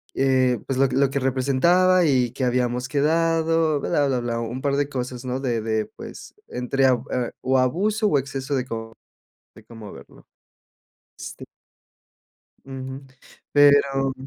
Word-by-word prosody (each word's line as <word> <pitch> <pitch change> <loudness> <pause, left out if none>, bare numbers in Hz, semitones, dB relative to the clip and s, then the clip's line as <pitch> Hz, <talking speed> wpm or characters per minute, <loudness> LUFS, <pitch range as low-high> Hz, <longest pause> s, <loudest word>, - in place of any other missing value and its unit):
eh, 130 -2 +2
pues, 135 - -3
lo 135 -1 +4
que 130 - -3
lo 135 -1 +3
que 140 - -2
representaba 140 +8 +3
y 130 -5 +2
que 130 - -5
habíamos 125 0 0
quedado, 160 +1 +1
bla, 145 0 0
bla, 130 -2 0
bla, 120 -1 -3
un 115 +3 -5
par 140 -1 0
de 145 0 0
cosas, 125 -2 -5
¿no?, 130 +1 -2
de 120 -4 -1
de, 110 -1 -1
pues, - - -11
entre 130 +2 -1
ab 125 -2 +1
eh, 125 -2 -2
o 130 0 +2
abuso 205 - +1
o 150 - +2
exceso 135 +1 -3
de 130 -2 -1
co 115 -2 -6 0.6
de - - -15
cómo 110 -3 -11
verlo, - - -15 0.9
este - - -8 1.2
Ujú. 135 0 -8 0.5
Pero 140 -2 +4
135 Hz, 155 wpm, -23 LUFS, 125-145 Hz, 1.2 s, lo